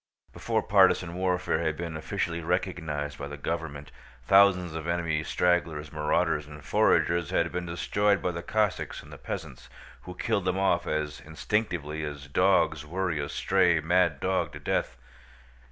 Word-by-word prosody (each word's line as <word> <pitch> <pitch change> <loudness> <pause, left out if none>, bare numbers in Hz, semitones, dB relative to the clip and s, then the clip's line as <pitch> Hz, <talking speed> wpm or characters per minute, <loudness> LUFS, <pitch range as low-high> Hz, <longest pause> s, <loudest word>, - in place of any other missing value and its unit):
Before - - -1
partisan 85 -2 +4
warfare 90 -2 0
had 80 -2 -1
been 85 -2 -5
officially 85 +2 -3
recognized 80 -4 -2
by 70 - -4
the 75 0 -7
government, 75 -2 -4 0.3
thousands 90 +1 +5
of 80 0 -5
enemy 85 -3 0
stragglers, 80 -4 0
marauders, 75 -1 0
and 75 0 -12
foragers 85 -2 +2
had 85 0 +1
been 90 0 -4
destroyed 100 +4 +1
by 90 - -1
the 85 0 -5
Cossacks 105 +1 -1
and - - -13
the - - -11
peasants, - - -7 0.3
who 90 - -9
killed 105 -2 -1
them 90 0 0
off 95 -3 +1
as 75 -1 -2
instinctively 80 -2 -2
as 75 -1 -6
dogs 75 +1 +2
worry 85 0 -2
a 70 0 -3
stray 85 -2 +2
mad 85 -2 +2
dog 95 +3 -1
to - - -8
death. - - -1
85 Hz, 155 wpm, -28 LUFS, 75-90 Hz, 0.3 s, thousands